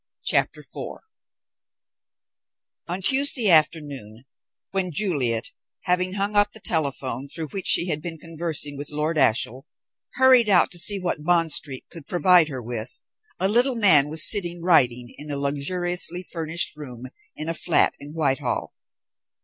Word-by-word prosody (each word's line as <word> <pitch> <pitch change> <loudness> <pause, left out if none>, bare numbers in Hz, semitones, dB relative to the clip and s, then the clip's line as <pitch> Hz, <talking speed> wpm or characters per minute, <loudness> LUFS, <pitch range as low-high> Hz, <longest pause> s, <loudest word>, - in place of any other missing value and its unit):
CHAPTER - - 0
IV - - -8 1.9
On 180 +2 -5
Tuesday 265 -3 +2
afternoon, 145 -8 0 0.5
when 190 -2 -2
Juliet, 140 - -1 0.3
having 180 +1 -1
hung 200 +1 -3
up 205 0 +2
the 220 - -12
telephone 140 - -3
through 155 +2 -5
which 195 +6 -3
she 175 - +4
had 150 -2 -1
been 165 0 -7
conversing 160 -3 -5
with 145 - -4
Lord 150 +2 -2
Ashiel, 125 0 +1 0.5
hurried 255 -4 +4
out 180 -4 +4
to 175 - 0
see 200 +3 +1
what 175 -4 -4
Bond 165 -1 +1
Street 135 -4 +1
could 165 -4 -11
provide 180 -2 +4
her 130 -5 -6
with, 115 0 -5 0.4
a 190 - +1
little 245 +5 +1
man 165 -10 +6
was 155 0 +4
sitting 175 -5 +1
writing 125 -8 +2
in 150 - -8
a 145 - -4
luxuriously 175 +5 -1
furnished 165 -1 -1
room 130 -5 -9 0.3
in 155 - -7
a 165 - -1
flat 165 +1 +3
in 145 +1 -11
Whitehall. 140 -5 -2
165 Hz, 150 wpm, -23 LUFS, 140-180 Hz, 1.9 s, man